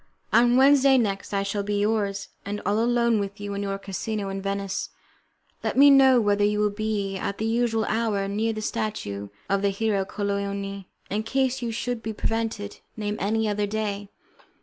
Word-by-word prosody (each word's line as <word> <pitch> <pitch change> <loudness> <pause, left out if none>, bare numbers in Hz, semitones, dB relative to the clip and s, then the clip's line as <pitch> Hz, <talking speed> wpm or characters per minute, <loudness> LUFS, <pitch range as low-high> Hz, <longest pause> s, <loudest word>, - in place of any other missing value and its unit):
On 240 +1 +5
Wednesday 275 0 +6
next 200 -5 -1
I 200 -1 0
shall 200 +1 -2
be 205 0 -1
yours, 205 -2 0
and 205 +1 -4
all 205 +3 +2
alone 235 -1 +2
with 200 0 -4
you 205 0 -4
in 200 - -3
your 195 -1 -2
casino 200 +1 -4
in 195 0 -4
Venice; 195 0 -3 0.7
let - - -2
me 285 +1 +8
know 265 -2 +7
whether 205 -2 +2
you 210 0 +2
will 210 0 +2
be 205 -2 -2
at 200 +1 -3
the 220 - -2
usual 225 -1 +1
hour 215 -3 0
near 215 +3 0
the 215 -1 -5
statue 100 - -3 0.2
of 195 0 +1
the 200 - +2
hero 200 0 0
Colleoni. 200 -1 -3 0.2
In 210 +2 0
case 265 +3 0
you 235 -1 -2
should 235 +1 -3
be 220 0 -4
prevented, 225 -2 -3 0.2
name 210 -1 -2
any 220 +2 +1
other 205 0 0
day." 205 -1 -3
210 Hz, 185 wpm, -25 LUFS, 200-225 Hz, 0.7 s, me